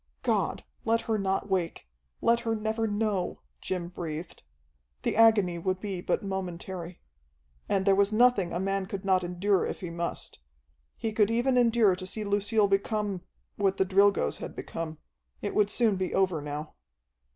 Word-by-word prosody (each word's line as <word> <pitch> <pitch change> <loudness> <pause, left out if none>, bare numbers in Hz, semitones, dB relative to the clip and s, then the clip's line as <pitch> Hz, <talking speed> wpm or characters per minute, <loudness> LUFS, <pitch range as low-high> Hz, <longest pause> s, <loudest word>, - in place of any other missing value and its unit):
"God, - - 0 0.2
let 230 0 +2
her 220 -2 -1
not 195 0 0
wake! 180 - -2 0.3
Let 235 0 +4
her 225 -1 -1
never 220 +1 -1
know!" 205 -3 -1 0.2
Jim 180 -2 -3
breathed. 165 -2 -6 0.6
The - - 0
agony 210 -6 +5
would 185 +2 -1
be 195 -3 -4
but - - -1
momentary. 185 -2 -5 0.7
And 190 -1 +1
there 195 - +5
was 200 +1 +3
nothing 215 -5 +4
a 175 - -2
man 195 0 -1
could 195 0 -5
not 185 -1 +3
endure 180 +2 +1
if - - -4
he 175 -3 -5
must. 170 0 -4 0.6
He 225 - -2
could 210 -1 +3
even 240 +3 +2
endure 230 -5 +4
to 185 0 -6
see 215 +3 -3
Lucille 205 +1 +2
become 200 -1 0 0.4
what 195 -1 +1
the 190 - +3
Drilgoes 195 - +3
had - - -7
become. 160 -1 -5 0.4
It - - -3
would 210 -1 +3
soon 215 -2 +2
be 185 -1 -2
over 185 -5 +2
now. 150 +1 -5
195 Hz, 165 wpm, -28 LUFS, 180-215 Hz, 0.7 s, agony